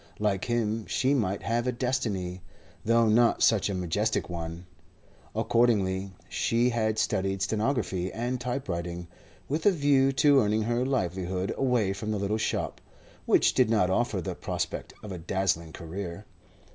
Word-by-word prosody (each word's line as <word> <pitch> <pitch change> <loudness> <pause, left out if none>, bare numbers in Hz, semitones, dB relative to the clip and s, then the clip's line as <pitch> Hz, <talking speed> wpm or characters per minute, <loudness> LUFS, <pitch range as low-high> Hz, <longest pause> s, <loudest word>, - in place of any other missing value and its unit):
Like 105 -3 0
him, 115 -2 -1
she 135 +2 +1
might 105 -7 0
have 120 +2 0
a - - +2
destiny, 110 -8 -2 0.4
though 115 +1 +3
not 115 +2 +4
such 105 -3 +4
a 100 - -2
majestic 95 +3 -1
one, 85 +1 -5 0.7
Accordingly 100 -5 +2 0.2
she 120 +2 +1
had 110 -2 0
studied 95 -2 0
stenography 105 -4 -1
and 120 +2 -3
typewriting, 90 -9 -3 0.4
with 155 +6 0
a - - +7
view 140 -5 +3
to 145 0 +5
earning 110 -1 +2
her 120 +2 0
livelihood 95 -7 -1
away 120 -7 +1
from 105 +2 -5
the 110 - 0
little 100 +2 -1
shop, - - -2 0.5
which - - +4
did 125 -3 +3
not 100 -5 +3
offer 105 -2 0
the - - -4
prospect - - -4
of 105 - -7
a 90 - -5
dazzling 85 -2 -1
career. 85 +1 -6
105 Hz, 150 wpm, -28 LUFS, 95-120 Hz, 0.7 s, a